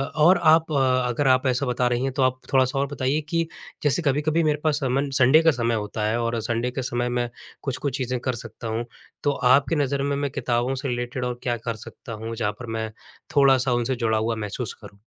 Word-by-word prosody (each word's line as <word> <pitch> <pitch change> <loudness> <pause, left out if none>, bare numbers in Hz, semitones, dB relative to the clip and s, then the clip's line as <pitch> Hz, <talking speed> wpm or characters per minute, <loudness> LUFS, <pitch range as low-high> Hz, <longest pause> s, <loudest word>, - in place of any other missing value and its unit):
और 165 +4 +6
आप 160 0 +5
अगर 130 0 +2
आप 130 +1 +4
ऐसा 130 +2 +1
बता 125 0 +1
रही 120 +1 0
हैं, 135 - 0
तो 135 - -1
आप 130 0 +1
थोड़ा-सा 130 0 +3
और 140 - +1
बताइए 140 +1 -1
कि 165 0 +1 0.4
जैसे 145 +3 +2
कभी-कभी 155 +2 +1
मेरे 150 -1 +1
पास 150 -2 +2
अमूमन 135 +2 0
संडे 135 +4 +6
का 165 - +6
समय 120 -4 0
होता 105 0 -3
है 110 +2 0
और 115 0 -1
संडे 120 +2 -1
के 130 - -3
समय, 120 0 -1
मैं 120 0 -1 0.3
कुछ-कुछ 135 -1 -2
चीज़ें 125 -1 -2
कर 125 0 -2
सकता 115 +1 -8
हूँ, 115 +2 -2 0.4
तो 145 - +3 0.2
आपकी 140 +3 +3
नज़र 140 0 -1
में 140 0 0
मैं 140 -1 -2
किताबों 125 0 -1
से 135 +2 -4
रिलेटेड 120 0 -3
और 125 -1 -3
क्या 120 -1 0
कर 115 - 0
सकता 115 - -9
हूँ, 115 +1 -5
जहाँ 110 -2 -1
पर 125 - -6
मैं 110 -1 -3 0.4
थोड़ा-सा 135 -2 +4
उनसे 120 +2 0
जुड़ा 115 -2 +1
हुआ 115 +1 0
महसूस 110 +1 -4
करूँ? 100 - -13
130 Hz, 220 wpm, -24 LUFS, 120-140 Hz, 0.4 s, और